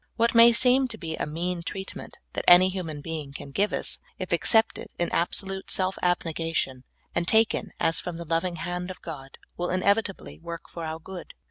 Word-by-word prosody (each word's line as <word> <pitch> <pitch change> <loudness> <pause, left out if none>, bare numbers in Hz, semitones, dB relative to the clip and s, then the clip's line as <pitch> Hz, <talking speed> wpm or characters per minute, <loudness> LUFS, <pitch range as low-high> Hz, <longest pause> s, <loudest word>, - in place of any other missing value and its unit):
What 230 0 +2
may 230 0 +8
seem 255 +3 +4
to 230 -3 -6
be 160 -5 -5
a - - -3
mean 170 +3 -3
treatment 190 +3 -7 0.2
that - - -3
any 180 +1 +8
human 165 -6 -5
being 150 -2 -6
can 140 - -9
give 205 +8 +1
us, - - -2 0.2
if - - -6
accepted 225 -1 +3
in 175 - -1
ab 170 - +1
solute 195 -1 -1
self 185 0 +2
abnegation, 165 -6 -1 0.3
and 175 0 -1
taken 220 +2 +3
as 165 0 +2
from 175 -2 -5
the 170 - -6
loving 165 +2 0
hand 175 +2 -4
of 185 - -9
God, 135 -5 -8 0.2
will 175 0 -2
inevitably 200 +2 0
work 170 0 -8
for 170 - -8
our 160 0 -4
good. 180 +2 -10
175 Hz, 195 wpm, -26 LUFS, 165-195 Hz, 0.3 s, may